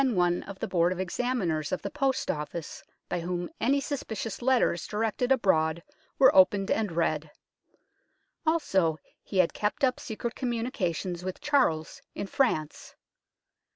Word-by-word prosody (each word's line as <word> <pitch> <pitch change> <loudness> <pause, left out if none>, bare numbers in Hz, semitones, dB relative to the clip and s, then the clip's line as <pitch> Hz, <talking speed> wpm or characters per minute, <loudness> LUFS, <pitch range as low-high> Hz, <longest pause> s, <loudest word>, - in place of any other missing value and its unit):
206 255 -7 +1
UNKNOWN 180 +2 -1
LONDON 170 -1 +4
of 185 - -3
Examiners 185 -6 -1
of 185 - -2
the 200 - -4
Post 270 -2 0
Office, 150 +2 -6 0.2
by 175 - -2
whom 175 0 -3
any 270 +5 +3
suspicious 235 -7 -4
letters 245 -8 +2
directed 225 +4 -1
abroad 170 -9 +2 0.3
were 265 - +6
opened 195 +1 +5
and 210 -5 0
read. 155 -2 0 1.1
Also, 195 - +2 0.2
he 195 - -5
had 180 -2 +4
kept 210 +6 -2
up 255 -2 +3
secret 230 0 -4
com 255 - -3
munications 190 - -2
with 185 0 -4
Charles 170 - +1
in - - -3
France. 190 - -1
195 Hz, 140 wpm, -28 LUFS, 170-245 Hz, 1.1 s, were